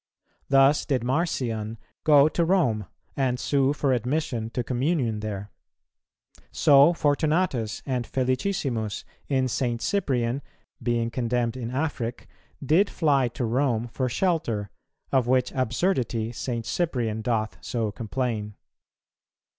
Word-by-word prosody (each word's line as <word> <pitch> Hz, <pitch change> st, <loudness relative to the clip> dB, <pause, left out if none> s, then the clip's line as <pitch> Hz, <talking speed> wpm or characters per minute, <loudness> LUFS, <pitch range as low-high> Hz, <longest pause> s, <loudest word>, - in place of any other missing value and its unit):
Thus 135 Hz, +1 st, +5 dB
did 130 Hz, -5 st, 0 dB
Marcion 120 Hz, -6 st, -1 dB, 0.3 s
go 145 Hz, -1 st, +6 dB
to 170 Hz, +2 st, 0 dB
Rome, 135 Hz, -, +1 dB, 0.3 s
and 130 Hz, -2 st, 0 dB
sue 140 Hz, -1 st, +2 dB
for 145 Hz, -2 st, +1 dB
admission 125 Hz, -2 st, -1 dB
to 125 Hz, +1 st, -2 dB
communion 125 Hz, -2 st, 0 dB
there. 105 Hz, -1 st, -5 dB, 1.0 s
So 145 Hz, +1 st, +6 dB
Fortunatus 150 Hz, -7 st, 0 dB
and 125 Hz, -4 st, -2 dB
Felicissimus 130 Hz, -, -1 dB, 0.2 s
in 130 Hz, -2 st, +1 dB
St. 120 Hz, -1 st, -1 dB
Cyprian, 130 Hz, -, 0 dB, 0.4 s
being 115 Hz, -1 st, 0 dB
condemned 120 Hz, -1 st, -1 dB
in 120 Hz, -3 st, -4 dB
Afric, 125 Hz, -3 st, -3 dB, 0.4 s
did 175 Hz, +9 st, +4 dB
fly 140 Hz, -6 st, +2 dB
to 120 Hz, +1 st, -3 dB
Rome 120 Hz, -1 st, 0 dB
for 130 Hz, +2 st, -2 dB
shelter; 120 Hz, -, -1 dB, 0.4 s
of 130 Hz, -3 st, +2 dB
which 125 Hz, 0 st, +2 dB
absurdity 125 Hz, -, 0 dB
St. 120 Hz, -1 st, -4 dB
Cyprian 120 Hz, -10 st, -1 dB
doth 110 Hz, -1 st, -1 dB
so 115 Hz, -4 st, -2 dB
complain. 110 Hz, -2 st, -3 dB
125 Hz, 115 wpm, -26 LUFS, 115-140 Hz, 1.0 s, go